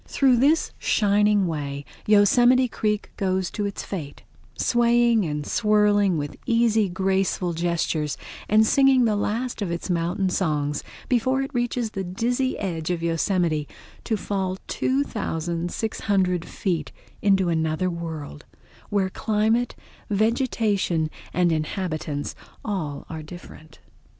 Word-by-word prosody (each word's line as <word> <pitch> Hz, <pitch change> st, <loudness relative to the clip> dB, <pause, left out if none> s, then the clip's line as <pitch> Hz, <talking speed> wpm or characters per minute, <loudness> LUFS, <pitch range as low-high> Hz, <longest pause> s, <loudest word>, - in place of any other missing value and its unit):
Through 265 Hz, -3 st, +3 dB
this 295 Hz, +6 st, +3 dB
shining 210 Hz, -1 st, +3 dB
way 145 Hz, -4 st, -4 dB, 0.2 s
Yosemite 240 Hz, +5 st, +5 dB
Creek 210 Hz, -2 st, -2 dB
goes 190 Hz, -2 st, 0 dB
to 205 Hz, -2 st, -2 dB
its 200 Hz, -, -5 dB
fate, 150 Hz, -8 st, -6 dB, 0.3 s
swaying 235 Hz, -2 st, +3 dB
and 150 Hz, -1 st, -3 dB
swirling 205 Hz, -3 st, +3 dB
with 145 Hz, -1 st, -4 dB
easy, 230 Hz, -3 st, +3 dB
graceful 190 Hz, -1 st, 0 dB
gestures 165 Hz, -3 st, -1 dB, 0.3 s
and 215 Hz, +1 st, +5 dB
singing 270 Hz, 0 st, +4 dB
the 215 Hz, -2 st, +2 dB
last 225 Hz, +4 st, -2 dB
of 200 Hz, -, -1 dB
its 170 Hz, +2 st, -3 dB
mountain 175 Hz, +3 st, 0 dB
songs 150 Hz, -5 st, -1 dB, 0.2 s
before 260 Hz, +2 st, +1 dB
it 270 Hz, -, -7 dB
reaches 240 Hz, -2 st, -1 dB
the 195 Hz, -, -3 dB
dizzy 240 Hz, +8 st, -1 dB
edge 165 Hz, -5 st, -3 dB
of 170 Hz, -2 st, -1 dB
Yosemite 165 Hz, -2 st, 0 dB, 0.4 s
to 220 Hz, -, -1 dB
fall 190 Hz, -2 st, -2 dB
2600 180 Hz, -, -1 dB
feet 165 Hz, -4 st, -2 dB, 0.3 s
into 195 Hz, -3 st, +3 dB
another 160 Hz, +2 st, 0 dB
world, 160 Hz, -, -6 dB, 0.5 s
where 195 Hz, -2 st, 0 dB
climate, 220 Hz, +3 st, +1 dB, 0.3 s
vegetation, 210 Hz, -, +1 dB, 0.2 s
inhabitants, 155 Hz, -3 st, -1 dB, 0.3 s
all 160 Hz, -10 st, -3 dB
are 160 Hz, -1 st, -6 dB
different. 160 Hz, -1 st, -12 dB
195 Hz, 115 wpm, -24 LUFS, 165-220 Hz, 0.5 s, Yosemite